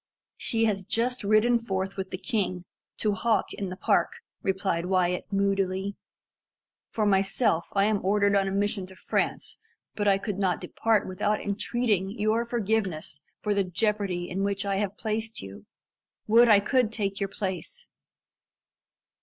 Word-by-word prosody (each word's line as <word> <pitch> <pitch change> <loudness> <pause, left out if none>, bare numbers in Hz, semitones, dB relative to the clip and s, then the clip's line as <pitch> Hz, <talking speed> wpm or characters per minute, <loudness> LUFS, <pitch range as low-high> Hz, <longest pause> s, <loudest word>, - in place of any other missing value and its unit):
"She 225 -1 0
has 200 -3 0
just 235 +5 0
ridden 215 +4 +4
forth 195 -3 -3
with 190 -1 -4
the - - -4
king, 185 -5 -2 0.3
to 210 -2 +1
hawk 220 +3 0
in 195 -2 -4
the 180 - -5
park," 195 - +1 0.3
replied 190 -3 -1
Wyat 180 +1 0
moodily. 195 0 0 0.9
"For 215 - -1
myself, 195 -2 +2
l 195 - +4
am 210 -1 +1
ordered 200 +1 +3
on 195 -1 +3
a - - -1
mission 200 -1 -1
to 190 - -14
France, - - -2 0.3
but 205 -1 -1
I 195 -1 +5
could 200 -1 -4
not 185 -3 +1
depart 225 -3 0
without 205 +3 0
entreating 205 -1 -1
your 220 +2 +1
forgiveness 205 -10 -2 0.2
for 210 - 0
the 200 -1 +2
jeopardy 190 -1 -1
in 190 +2 -2
which 200 0 -1
I 195 -1 0
have 200 0 -2
placed 220 - -3
you. 100 +1 -11 0.6
Would 230 +2 +6
I 205 -2 +7
could 245 +1 +2
take 200 -3 -2
your 195 -1 -1
place." 200 - -5
200 Hz, 155 wpm, -27 LUFS, 190-215 Hz, 0.9 s, I